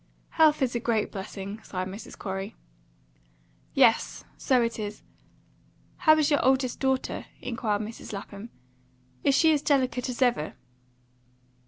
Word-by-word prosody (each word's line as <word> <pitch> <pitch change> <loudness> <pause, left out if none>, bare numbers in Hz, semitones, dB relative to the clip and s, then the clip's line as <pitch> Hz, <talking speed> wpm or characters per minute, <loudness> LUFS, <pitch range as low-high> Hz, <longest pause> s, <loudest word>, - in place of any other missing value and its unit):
"Health 310 -3 +4
is 250 - 0
a 240 - 0
great 225 -2 0
blessing," 200 +1 -6
sighed 185 -3 -4
Mrs. 195 +4 -9
Corey. 195 +2 -5 1.2
"Yes, - - +3
so 255 -2 +2
it 230 -1 -2
is. 210 0 -5 0.9
How 315 -3 +5
is 305 0 +2
your 290 - +3
oldest 260 -1 +2
daughter?" 265 -1 -1
inquired 220 -4 -2
Mrs. 220 +2 -8
Lapham. 200 +2 -7 0.7
"Is 275 - +4
she 320 +1 +5
as 295 - +1
delicate 260 -3 +1
as 250 +1 +1
ever?" 240 -11 0
240 Hz, 135 wpm, -27 LUFS, 205-265 Hz, 1.2 s, How